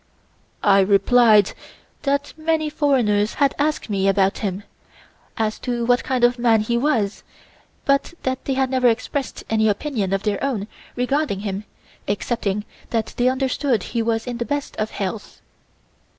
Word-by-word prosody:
I 200 -1 +5
replied 205 +2 +5 0.5
that 280 0 -1
many 315 -1 0
foreigners 225 -9 +2
had 280 -2 +2
asked 305 +1 0
me 195 -3 0
about 195 0 +2
him 200 -1 -3 0.7
as 220 -1 -1
to 240 -1 -2
what 245 +1 +3
kind 255 -2 -1
of 240 0 +4
man 230 -2 +4
he 235 +2 -1
was, 235 -6 0 0.6
but 275 +4 +1
that 260 0 -2
they 270 - 0
had 265 -1 +1
never 255 -1 +3
expressed 260 +4 -1
any 220 0 +2
opinion 210 -3 -1
of 195 0 0
their 210 -2 -1
own 230 -7 -1 0.3
regarding 250 -4 0
him 200 0 -4 0.4
excepting 205 0 -1 0.2
that 225 -2 -2
they 245 +1 +3
understood 260 -3 0
he 235 - -2
was 225 0 0
in 245 -2 -5
the 235 - -1
best 285 +1 -3
of 215 0 -1
health. 205 +1 -5
235 Hz, 155 wpm, -22 LUFS, 205-265 Hz, 0.7 s, I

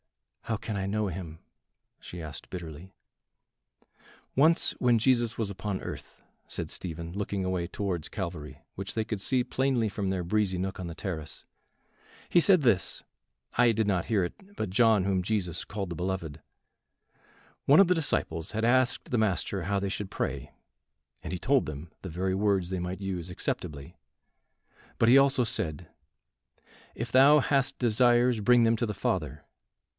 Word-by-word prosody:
"How 110 - -1
can 110 0 -5
I 95 -1 -2
know 105 +2 0
him?" 85 -3 -6 0.6
she 90 - -8
asked 75 -5 -8
bitterly. 85 0 -8 1.4
"Once 160 +5 +4
when 120 -2 +4
Jesus 120 -1 +2
was 110 -3 -1
upon 100 0 -3
earth," - - -8 0.3
said - - -5
Stephen, 85 -1 -5
looking 100 -1 -2
away 90 -2 -1
towards 90 -4 -3
Calvary, 85 -7 -6 0.2
which 95 0 -5
they 110 -1 0
could 110 -3 -4
see 125 +3 +1
plainly 130 -3 +1
from 100 -1 -3
their 95 -2 -1
breezy 95 +1 0
nook 95 +1 -3
on 90 - -4
the 85 - -7
terrace, 80 -5 -6 0.8
"he 175 - +4
said 185 -1 +5
this 115 -9 +2 0.6
I 120 -1 +6
did 110 -1 0
not 90 -4 +1
hear 100 -5 +1
it - - -5 0.2
but 105 - -3
John, 110 -2 +4
whom 95 -2 +1
Jesus 90 -3 -2
called 100 -3 -5
the 85 - -5
beloved; 85 -3 -4 1.2
one 145 +3 +7
of 195 - +7
the 180 - +3
disciples, 80 - -1
had 110 +1 -1
asked 130 +1 +2
the 125 - +2
Master 95 -2 0
how 100 +3 0
they 100 - -2
should 100 0 -4
pray, - - -3 0.7
and - - -5
he 90 - -3
told 135 +5 +2
them 75 +3 -7
the 95 - -6
very 95 +3 -1
words 100 -3 +1
they 95 - -1
might 90 +2 -4
use 95 -3 -4
acceptably; 70 -5 -5 1.0
but 115 - +3
he 125 +3 +8
also 135 -2 +4
said, 80 -5 -2 1.1
If 120 +1 -5
thou 140 +3 +7
hast 135 -1 +1
desires 120 0 +3
bring 120 +3 +5
them 115 0 +4
to 120 - -1
the 105 - -4
Father. 75 -6 -2
100 Hz, 165 wpm, -28 LUFS, 90-120 Hz, 1.4 s, he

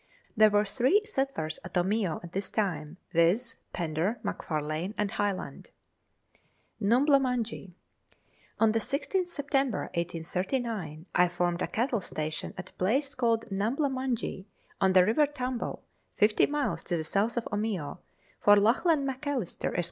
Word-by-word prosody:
There 215 -1 +7
were 205 0 +3
three 255 - +3
settlers 270 - -2
at 175 - -9
Omeo 190 -1 0
at 170 - -9
this 195 +1 -3
time, 165 -6 -2
viz., 185 +9 +2
Fender, 170 +6 -1
McFarlane, 155 +4 -3
and 205 -1 0
Hyland. 205 -2 -3 1.1
Numbla 265 +7 +5
Munjee. 235 -7 -2 0.9
On 225 -1 +5
the 225 - +1
16th 350 - -1
September 275 - -1
1839 175 - -3
I 180 0 +5
formed 175 0 -1
a - - 0
cattle 235 -1 0
station 155 -2 -4
at 185 -1 -7
a - - -38
place 270 +9 +1
called 230 -4 +1
Numbla 235 +9 0
Munjee, 255 -7 -2 0.4
on 190 -1 +4
the 185 -1 +7
River 260 +8 +3
Tambo, 255 -4 -4 0.3
50 210 +1 +4
miles 295 -1 -1
to 175 - 0
the 160 - -2
south 205 +9 0
of 235 - 0
Omeo, 200 -7 -2 0.4
for 205 - +7
Lachlan 275 - +3
Macalister, 265 - -2
Esq. - - +2
210 Hz, 140 wpm, -29 LUFS, 180-255 Hz, 1.1 s, There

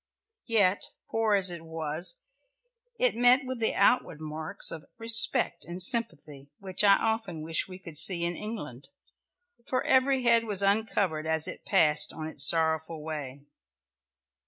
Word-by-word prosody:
Yet 205 -5 +2 0.2
poor 225 -2 0
as 190 -2 +1
it 170 -1 -8
was, 160 - -2 0.7
it - - +1
met 245 +2 +3
with 255 -1 -6
the 225 - -1
outward 165 -10 +1
marks 155 0 -3
of 160 -3 -10
respect 230 +2 +4
and 175 +1 -9
sympathy 160 - +1
which 190 +1 -4
I 200 -1 +5
often 220 -8 -4
wish 160 0 -1
we 185 -1 -11
could 165 -5 -7
see 170 0 +2
in 170 0 -4
England, 150 - -9 0.8
for 255 - -2
every 265 0 +1
head 230 -1 +3
was 200 -3 +2
uncovered 195 -6 -1
as 160 -1 -2
it - - -10
passed 155 -5 +4
on 155 - -8
its 155 -3 -4
sorrowful 160 -1 -1
way. 145 -4 -8
180 Hz, 150 wpm, -27 LUFS, 160-225 Hz, 0.8 s, I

